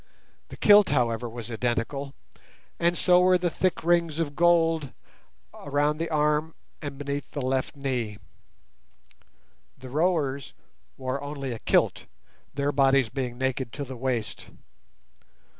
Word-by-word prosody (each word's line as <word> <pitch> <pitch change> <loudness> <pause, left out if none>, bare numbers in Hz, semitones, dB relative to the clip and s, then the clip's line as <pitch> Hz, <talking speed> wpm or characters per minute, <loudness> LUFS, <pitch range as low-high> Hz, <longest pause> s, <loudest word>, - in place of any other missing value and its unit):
The - - -11
kilt, 205 -1 +6
however, 120 -3 0
was 120 0 -7
identical, 125 +4 -2 0.6
and 170 0 +2
so 180 -1 +5
were 185 0 +5
the 175 -1 -1
thick 185 -1 -1
rings 170 -2 +2
of 150 -4 -2
gold 165 -4 +3 0.6
around 145 +1 0
the 165 - -2
arm 150 +1 +1 0.3
and 145 -3 -6
beneath 140 0 -4
the 145 - -5
left 130 +2 -1
knee. 125 -7 -3 1.6
The 130 -1 -11
rowers 145 -4 0 0.4
wore 130 +1 -3
only 140 -2 -5
a 115 - -5
kilt, - - +1 0.5
their 140 0 0
bodies 135 -3 +3
being 125 -1 -4
naked 130 -2 -2
to 145 - -4
the 130 -1 -7
waist. 120 -5 -3
140 Hz, 130 wpm, -26 LUFS, 130-160 Hz, 1.6 s, kilt